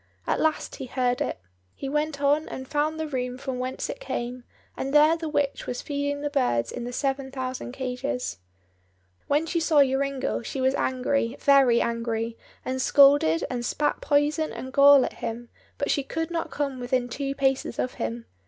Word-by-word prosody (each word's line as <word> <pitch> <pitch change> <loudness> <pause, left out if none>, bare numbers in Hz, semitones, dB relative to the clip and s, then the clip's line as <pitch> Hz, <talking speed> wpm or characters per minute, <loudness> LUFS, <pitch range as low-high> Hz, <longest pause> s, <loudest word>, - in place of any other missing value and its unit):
At - - 0
last 315 -1 0
he 265 - -6
heard 250 0 0
it. - - -2 0.4
He 275 - -6
went 300 +1 -1
on 295 +2 +2
and 260 0 -7
found 305 +3 0
the 315 - -1
room 250 -4 -3
from 260 -1 -4
whence 255 +1 -3
it - - -6
came, 250 - -4 0.3
and 275 +2 -3
there 305 +2 +6
the 325 -1 -4
witch 285 -2 -1
was 245 - -4
feeding 285 0 -2
the 290 - -1
birds 120 - +1
in 245 - -5
the 245 - -4
seven 270 +1 -1
thousand 255 -2 -4
cages. 255 - -3 0.9
When 295 +3 +2
she 335 +1 -1
saw 315 -3 +5
Joringel 270 0 -1
she 250 +4 -5
was 260 0 +2
angry, 255 -2 0
very 270 -4 +5
angry, 230 -1 -2 0.3
and 260 0 -2
scolded 275 - +5
and 245 -2 -3
spat 295 +4 0
poison 295 +2 +1
and 260 +1 -7
gall 280 -1 +7
at - - -5
him, 235 +1 -5 0.3
but 285 - 0
she 280 - +1
could 325 +4 -4
not 335 -1 -2
come 280 -3 -3
within 245 0 0
two 275 +2 -3
paces 270 -1 0
of 250 - -1
him. 115 +1 -3
270 Hz, 185 wpm, -26 LUFS, 250-290 Hz, 0.9 s, gall